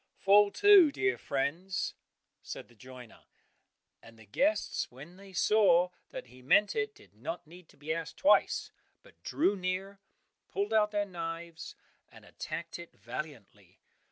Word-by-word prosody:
"Fall 205 Hz, +1 st, +5 dB
to, 405 Hz, -6 st, +7 dB
dear 385 Hz, +6 st, 0 dB
friends," 165 Hz, +8 st, -2 dB, 0.5 s
said -, -, -8 dB
the -, -, -19 dB
joiner; 125 Hz, 0 st, -13 dB, 0.8 s
and 115 Hz, 0 st, -16 dB
the 110 Hz, -, -16 dB
guests 290 Hz, -, 0 dB
when 145 Hz, +8 st, -12 dB
they 195 Hz, +1 st, -14 dB
saw 185 Hz, -2 st, +4 dB, 0.2 s
that -, -, -7 dB
he 125 Hz, +1 st, -17 dB
meant 200 Hz, +11 st, +3 dB
it, 215 Hz, -1 st, -2 dB
did 100 Hz, -, -20 dB
not 165 Hz, +11 st, -6 dB
need 175 Hz, +2 st, -15 dB
to -, -, -21 dB
be 150 Hz, +3 st, -3 dB
asked 165 Hz, -1 st, -6 dB
twice, 285 Hz, -, +3 dB, 0.3 s
but -, -, -21 dB
drew 245 Hz, -9 st, +1 dB
near, 190 Hz, +1 st, -3 dB, 0.5 s
pulled 400 Hz, -, -2 dB
out 215 Hz, -1 st, +4 dB
their 205 Hz, -1 st, -1 dB
knives 170 Hz, -2 st, -7 dB, 0.3 s
and -, -, -16 dB
attacked 170 Hz, 0 st, -6 dB
it 170 Hz, -, -11 dB
valiantly. 145 Hz, -9 st, -9 dB
175 Hz, 150 wpm, -31 LUFS, 145-205 Hz, 0.8 s, to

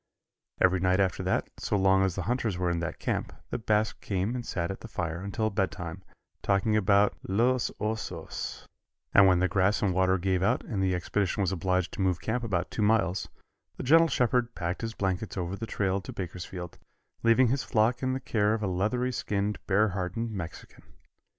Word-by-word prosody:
Every 95 Hz, 0 st, +4 dB
night 95 Hz, +1 st, +2 dB
after 95 Hz, -2 st, +1 dB
that, -, -, 0 dB
so 105 Hz, -, 0 dB
long 95 Hz, 0 st, +4 dB
as 95 Hz, -2 st, +1 dB
the 95 Hz, -, -2 dB
hunters 115 Hz, -5 st, -1 dB
were 90 Hz, -1 st, 0 dB
in 85 Hz, -, -1 dB
that 85 Hz, -1 st, -4 dB
camp, -, -, -2 dB, 0.2 s
the -, -, -2 dB
Basque 110 Hz, -1 st, 0 dB
came 100 Hz, +3 st, -1 dB
and 125 Hz, -1 st, -3 dB
sat 85 Hz, -6 st, -2 dB
at 95 Hz, -, -7 dB
the -, -, -8 dB
fire 85 Hz, -5 st, -3 dB
until 110 Hz, +2 st, -1 dB
bedtime, 95 Hz, -3 st, -3 dB, 0.4 s
talking 100 Hz, +2 st, +2 dB
about 100 Hz, 0 st, +4 dB
los 120 Hz, +6 st, +2 dB
osos, 110 Hz, +1 st, -4 dB, 0.5 s
and 100 Hz, -1 st, +8 dB
when 90 Hz, -1 st, +5 dB
the 95 Hz, +1 st, +2 dB
grass 95 Hz, +3 st, +2 dB
and 95 Hz, -3 st, +2 dB
water 95 Hz, +1 st, +3 dB
gave 95 Hz, 0 st, 0 dB
out 115 Hz, +7 st, +2 dB
and 100 Hz, -4 st, -3 dB
the 95 Hz, -1 st, +2 dB
expedition 100 Hz, +2 st, -1 dB
was 95 Hz, -2 st, +1 dB
obliged 90 Hz, 0 st, 0 dB
to -, -, -5 dB
move 90 Hz, -2 st, +1 dB
camp 110 Hz, +8 st, -2 dB
about 90 Hz, -6 st, -1 dB
two -, -, -3 dB
miles, 105 Hz, -4 st, +2 dB, 0.5 s
the -, -, -5 dB
gentle 165 Hz, +5 st, +6 dB
shepherd 125 Hz, -3 st, +1 dB
packed 85 Hz, +2 st, -3 dB
his 115 Hz, -1 st, -4 dB
blankets 95 Hz, +2 st, -2 dB
over 90 Hz, +1 st, -2 dB
the 115 Hz, +3 st, -6 dB
trail 95 Hz, -1 st, 0 dB
to 90 Hz, -, -8 dB
Bakersfield, 90 Hz, -1 st, -6 dB, 0.4 s
leaving 115 Hz, +2 st, +4 dB
his 135 Hz, +3 st, +1 dB
flock 115 Hz, +1 st, +1 dB
in 130 Hz, 0 st, 0 dB
the 130 Hz, -, -2 dB
care 110 Hz, -4 st, +1 dB
of 110 Hz, -, -4 dB
a -, -, +1 dB
leathery 110 Hz, +8 st, 0 dB
skinned 105 Hz, -3 st, -2 dB
bear 105 Hz, +2 st, +3 dB
hardened 95 Hz, +5 st, -3 dB
Mexican. 90 Hz, -5 st, -7 dB
100 Hz, 195 wpm, -28 LUFS, 95-110 Hz, 0.5 s, and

